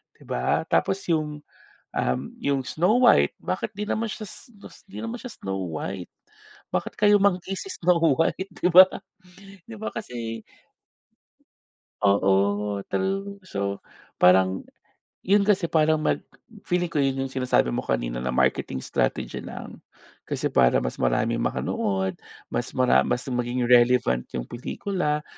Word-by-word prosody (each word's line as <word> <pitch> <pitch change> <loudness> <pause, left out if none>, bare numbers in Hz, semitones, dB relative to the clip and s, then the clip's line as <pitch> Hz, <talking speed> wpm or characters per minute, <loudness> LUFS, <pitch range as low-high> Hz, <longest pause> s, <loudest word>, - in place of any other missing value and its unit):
di - - -19
ba? 60 +1 0
Tapos 195 0 +1
yung, 150 -2 -1 0.5
um, 65 - 0 0.2
yung 140 -1 +1
Snow 190 +9 +2
White, 70 0 +4
bakit 90 - -3
'di 210 +1 -5
naman 225 -1 -1
siya 215 - -6
s 240 - -11
'dis 205 -2 -15
'di 195 - -10
naman 230 +1 -4
siya 250 - -7
Snow 95 - -4
White? 90 +3 -5 0.6
Bakit - - -2
kayumanggi 200 -3 +3
si 390 - -7
Snow 175 0 +2 0.2
White, 190 +4 0
'di 180 - +3
ba? 185 +1 +11 0.8
'Di 230 - -7
ba 220 - -3
kasi 115 - -5 1.6
Oo, 100 +1 +2
true, 195 +1 -2
so 100 - -3 0.4
parang 95 +1 +4 0.6
yun 200 +2 +4
kasi 200 -3 +2
parang 155 -1 +3
mag - - +1 0.5
feeling 175 -1 0
ko 150 - 0
yun 135 0 0
yung 130 - -7
sinasabi 125 - +1
mo - - -1
kanina - - -2
na 65 - -2
marketing 65 +1 0
strategy - - -1
lang. - - -9 0.5
Kasi - - -2
para 60 - +4
mas - - -4
maraming - - +1
makanood, 95 -1 -1 0.4
mas 120 +2 -1
mara 130 -1 +4
mas 125 - -1
maging 125 -1 -1
relevant 120 - +4
yung - - -3
pelikula, 150 - -3
130 Hz, 140 wpm, -25 LUFS, -, 1.6 s, ba